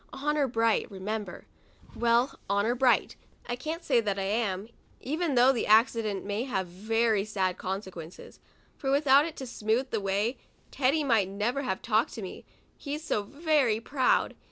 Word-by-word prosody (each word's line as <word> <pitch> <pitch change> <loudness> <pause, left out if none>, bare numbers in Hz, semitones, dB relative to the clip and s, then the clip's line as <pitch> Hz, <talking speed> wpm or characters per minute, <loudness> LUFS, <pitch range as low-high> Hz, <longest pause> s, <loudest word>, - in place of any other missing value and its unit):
Honor 290 +1 0
bright, 230 -2 +1
remember. 205 +2 -5 0.5
Well, 235 +3 +2
honor 200 +4 +2
bright, 250 0 +2 0.3
I 240 - -3
can't 320 +6 -5
say 250 -7 +3
that 205 -3 -2
I 195 - -1
am, 200 -1 -1 0.3
even 310 +2 -2
though 250 +2 +6
the 245 - -2
accident 215 -2 +3
may 205 +4 -2
have 190 -8 -2
very 215 +3 0
sad 190 -3 -2
consequences, 185 -3 -7 0.4
for 270 - -4
without 280 +1 +5
it 325 - -8
to 265 - -6
smoothe 235 +2 -1
the 220 - -1
way, 200 +5 -1 0.3
Teddy 285 +3 +1
might 225 -8 +2
never 215 +7 -1
have 245 -9 -3
talked 220 0 +1
to 220 - -6
me, 185 - -8 0.3
he's 295 +1 -6
so 215 - 0
very 285 -2 +1
proud. 255 +2 +1
230 Hz, 160 wpm, -28 LUFS, 205-270 Hz, 0.5 s, though